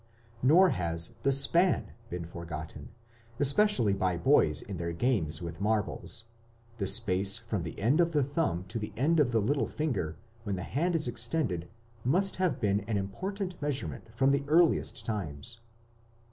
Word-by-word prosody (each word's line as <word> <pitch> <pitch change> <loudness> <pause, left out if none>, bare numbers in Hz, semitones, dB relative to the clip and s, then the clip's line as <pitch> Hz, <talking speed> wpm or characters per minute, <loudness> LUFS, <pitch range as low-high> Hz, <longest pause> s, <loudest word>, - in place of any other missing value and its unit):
Nor 170 +8 +6
has 85 - -1
the 140 - +2
span 170 +7 +3 0.2
been 90 -1 -5
forgotten, 80 -1 -8 0.5
especially 140 - +3
by 95 -2 0
boys 85 - +3
in 100 -3 -6
their 85 0 -3
games 85 - 0
with 85 +1 -7
marbles; 110 +1 -1 0.5
the 100 - -1
space 100 -2 +3
from 115 -5 -3
the 80 -1 -6
end 130 - +3
of 170 0 +2
the 150 -3 +2
thumb 140 - -1
to 115 - -3
the 105 - -5
end 155 +6 +2
of 135 -5 +3
the 115 - +2
little 135 +7 0
finger 125 - -2 0.2
when 105 -4 -3
the 90 - -4
hand 170 - -1
is 155 -5 +1
extended 115 - -2 0.3
must 185 +10 +1
have 180 -8 0
been 100 -2 +1
an 110 -3 0
important 185 - -4
measurement 130 - -3
from 135 +1 +3
the 140 0 +1
earliest 165 +2 +2
times. 105 +1 -4
115 Hz, 160 wpm, -30 LUFS, 90-150 Hz, 0.5 s, Nor